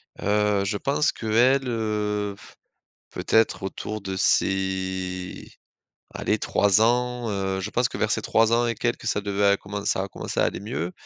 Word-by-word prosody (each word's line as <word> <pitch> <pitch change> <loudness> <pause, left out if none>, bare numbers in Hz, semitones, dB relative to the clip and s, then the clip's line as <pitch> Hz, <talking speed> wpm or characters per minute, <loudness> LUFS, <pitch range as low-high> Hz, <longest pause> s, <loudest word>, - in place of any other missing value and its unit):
Heu, 105 -1 +1
je 105 +1 -1
pense 140 +6 +1
qu'elle, 125 +4 +2
heu, 105 -3 -1
f - - -16 0.5
peut-être 110 -3 +1
autour 105 +2 -4
de 95 -1 -4
ses, 95 -1 -1 0.6
allez - - 0
3 100 0 +3
ans, 120 +1 +1
heu, 95 -1 -2
je 100 +3 -4
pense 120 0 +1
que - - -7
vers 110 - 0
ses - - 0
3 115 0 +3
ans 120 +1 +3
et 115 - 0
quelques, 115 +1 -2
ça 105 - +1
devait 100 0 0
à 100 0 +5
commencer 100 +1 -6
ça 95 - 0
à - - -7
commencer - - -4
à - - +4
aller - - -2
mieux. 90 -3 -4
105 Hz, 180 wpm, -25 LUFS, 95-115 Hz, 0.6 s, à